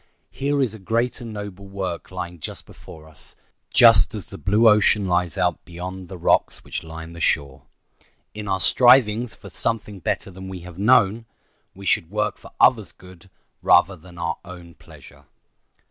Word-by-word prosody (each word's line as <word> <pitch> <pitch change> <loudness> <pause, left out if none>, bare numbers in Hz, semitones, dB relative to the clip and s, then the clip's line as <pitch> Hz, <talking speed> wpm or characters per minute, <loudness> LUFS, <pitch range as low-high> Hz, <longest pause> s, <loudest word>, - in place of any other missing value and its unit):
Here 140 0 0
is 115 -5 -1
a 110 - -8
great 115 +5 -1
and 115 -2 -7
noble 100 -2 -8
work 95 -3 -5
lying 90 -2 -7
just - - -6
before 80 0 -14
us, 80 -1 -10 0.4
just - - +6
as - - -5
the - - -9
blue 105 +4 +3
ocean 105 -1 +4
lies 90 -2 0
out - - 0
beyond 90 +2 -8
the 95 - -9
rocks 85 - +1
which - - -6
line 80 0 -9
the 85 - -10
shore. 70 -5 -1 0.7
In 105 -1 -7
our 95 -1 0
strivings 120 -1 +4
for - - -13
"something 105 -3 -2
better 95 - -3
than 95 +1 -10
we 95 -2 -7
have 90 0 -11
known" 115 0 +3 0.5
we 100 +1 -11
should 85 - +1
work 105 0 -2
for - - -13
others' - - +4
good 90 0 -16 0.3
rather 95 +3 +4
than 85 +1 -16
our 85 0 -3
own 85 -2 -12
pleasure. - - -17
95 Hz, 175 wpm, -22 LUFS, 85-105 Hz, 0.7 s, just